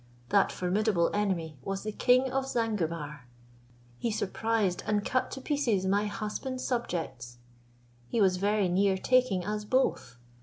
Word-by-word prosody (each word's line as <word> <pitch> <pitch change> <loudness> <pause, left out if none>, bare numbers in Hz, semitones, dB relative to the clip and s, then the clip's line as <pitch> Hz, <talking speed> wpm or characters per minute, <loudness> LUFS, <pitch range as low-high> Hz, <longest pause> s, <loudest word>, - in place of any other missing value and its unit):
That 200 -1 +4
formidable 185 -1 +1
enemy 170 -8 -1
was 195 0 -4
the 215 - -3
king 255 +4 +3
of 270 0 -1
Zanguebar. 165 - -2 0.7
He 235 - -1
surprised 215 -2 0
and 210 -1 +1
cut 255 - 0
to 265 - -7
pieces 255 -10 0
my 200 +2 +2
husband's 230 +5 -4
subjects. 135 - -3 0.7
He 235 - 0
was 190 -3 +4
very 205 +1 +2
near 190 +2 +2
taking 250 -5 +2
us 210 +1 -2
both. 210 - 0
205 Hz, 140 wpm, -29 LUFS, 180-230 Hz, 0.7 s, That